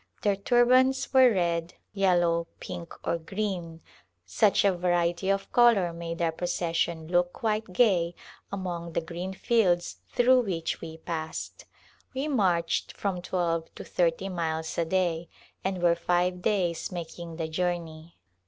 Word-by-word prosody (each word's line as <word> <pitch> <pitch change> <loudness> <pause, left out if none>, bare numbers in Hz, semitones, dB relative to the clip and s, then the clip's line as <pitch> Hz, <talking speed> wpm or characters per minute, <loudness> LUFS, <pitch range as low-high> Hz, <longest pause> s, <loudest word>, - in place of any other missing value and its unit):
Their 205 -1 +3
turbans 255 +6 +3
were 260 -2 +7
red, 170 -3 -1 0.2
yellow, 175 -4 +2
pink 170 -1 -7 0.2
or 170 - +1
green; 175 -2 -4 0.4
such 195 - +3
a 195 -2 +4
variety 175 +1 0
of 195 0 0
color 225 -8 +4
made 170 0 -4
our 165 - +2
pro 170 +2 -4
cession 170 -2 -1
look 175 +1 +1
quite 215 -3 -2
gay 180 -5 +3 0.4
among 175 -3 -4
the - - 0
green 175 +3 -5
fields 185 -7 +1
through 255 +1 +5
which 170 -7 -3
we 160 -1 -7
passed. 160 - -5 0.5
We 270 +3 -1
marched 180 - +1
from 190 -3 -2
twelve 170 -2 -1
to - - -7
thirty 175 +2 0
miles 160 -3 -3
a 170 - +2
day 170 -2 0 0.3
and 190 -2 -2
were 170 -1 +5
five 180 +1 0
days 180 -5 0
making 170 -1 -7
the 160 -1 -3
journey. 165 -1 -3
175 Hz, 145 wpm, -28 LUFS, 170-195 Hz, 0.5 s, were